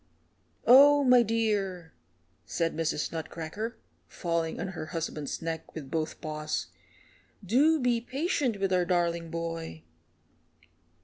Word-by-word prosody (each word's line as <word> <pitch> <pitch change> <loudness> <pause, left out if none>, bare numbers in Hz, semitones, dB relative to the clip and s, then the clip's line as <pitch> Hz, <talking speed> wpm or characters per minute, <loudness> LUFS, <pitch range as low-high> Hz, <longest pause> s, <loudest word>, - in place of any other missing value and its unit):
"Oh, 285 +4 +8
my 250 -2 +6
dear," 205 -7 -1 0.5
sobbed 165 -1 -2
Mrs. 155 -2 -1
Nutcracker, 165 +7 -5 0.3
falling 170 -2 -2
on 190 - -3
her 160 -4 -6
husband's 155 -2 -4
neck 165 -1 -5
with 145 -4 -7
both 160 -1 -2
paws, 155 0 -3 0.8
"do 290 - +4
be 245 -3 +1
patient 265 - -1
with 195 -1 0
our 180 -1 +3
darling 170 -2 0
boy." 165 - -5
175 Hz, 115 wpm, -29 LUFS, 160-230 Hz, 0.8 s, Oh